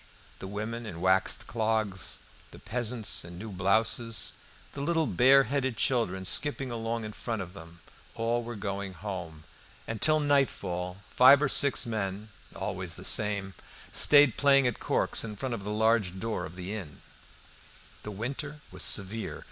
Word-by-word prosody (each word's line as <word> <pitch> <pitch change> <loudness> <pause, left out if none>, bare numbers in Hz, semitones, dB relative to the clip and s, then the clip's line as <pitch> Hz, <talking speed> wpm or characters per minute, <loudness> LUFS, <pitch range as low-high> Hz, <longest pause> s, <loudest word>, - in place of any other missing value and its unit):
The 95 - -7
women 110 +3 -5
in 85 -5 -7
waxed 95 +1 +2
clogs, 110 -5 -2 0.3
the - - -13
peasants 120 -1 -1
in 85 0 -10
new 105 +3 -7
blouses, 110 +4 +1 0.4
the 140 - -6
little 165 +2 +1
bare 135 +1 +5
headed 130 -2 -2
children 95 -8 0
skipping 135 +2 0
along 115 -1 -3
in 105 - -7
front 115 0 -4
of 90 -2 -7
them, 85 -2 -13 0.3
all 115 +1 0
were 120 0 -7
going 100 -1 -4
home. 90 -7 -7 0.4
And 115 -2 -5
till 155 0 +5
nightfall, 100 -10 -1
five 130 +2 +7
or 150 -1 +1
six 140 0 +3
men, 105 -2 -4 0.3
always 90 -2 -4
the 95 - -7
same, 100 -3 +3 0.4
stayed 145 -4 +5
playing 140 -1 +4
at 125 - -1
corks - - +1
in 105 -2 -6
front 130 +3 -4
of 110 -4 -5
the 105 - -5
large 105 -3 +1
door 110 -5 -3
of 85 - -13
the 90 +2 -6
inn. 90 -10 -8 1.0
The - - -7
winter 140 +8 -5
was 95 -1 -5
severe. 105 +3 +1
110 Hz, 160 wpm, -28 LUFS, 95-125 Hz, 1.0 s, five